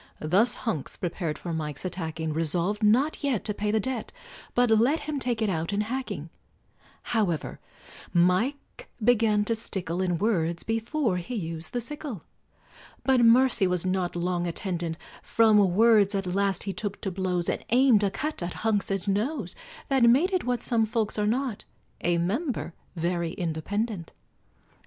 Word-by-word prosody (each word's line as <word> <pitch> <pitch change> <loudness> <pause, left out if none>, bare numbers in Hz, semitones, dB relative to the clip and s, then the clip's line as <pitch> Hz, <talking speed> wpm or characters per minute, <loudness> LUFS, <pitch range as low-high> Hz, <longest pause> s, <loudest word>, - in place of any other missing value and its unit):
Thus 190 +10 +2
Hunks 215 - -3
prepared 170 -3 -3
for 170 - -5
Mike's 150 0 -4
attacking, 160 -3 -3
Resolved 170 +6 0
not 250 +10 +3
yet 265 -8 0
to 210 - 0
pay 210 +1 -2
the 220 +1 +2
debt, 245 +1 -3 0.4
But 245 -1 +3
let 240 +8 +3
him 300 -2 -3
take 240 -3 -1
it - - +1
out 165 0 -1
in 205 - +1
hacking; 255 +5 -4 0.7
However, 200 -9 -1 0.5
Mike 220 - 0
began 215 -3 +3
to 230 - +1
stickle 190 -5 -3
In 180 -2 0
words 170 -5 0
before 225 -1 -1
he 180 +8 -5
used 165 -5 -4
the 245 - -1
sickle; 275 - -6 0.8
But 265 -2 +3
mercy 235 -3 +5
was 180 -1 -1
not 185 -1 -1
long 175 0 -1
attendant: 170 -2 -2 0.2
From 220 -2 +4 0.2
words 215 -2 +5
at 195 -1 -1
last 195 0 0
he 195 - -3
took 205 -1 -4
to 195 - -2
blows, 180 -2 -1
And - - -1
aimed 245 -3 +5
a 200 - +3
cut 300 +7 -4
at 175 0 -3
Hunks's 200 -3 0
nose, 210 - -1 0.3
That 270 -2 +2
made 320 +11 +4
it 370 - +1
what 245 -1 -1
some 225 -2 +1
folks 220 -2 -1
are 210 - +1
not 245 -1 -1 0.4
A 175 0 +2
member 220 - -2 0.2
very 170 0 -1
independent. 180 +3 -3
205 Hz, 160 wpm, -27 LUFS, 175-235 Hz, 0.8 s, mercy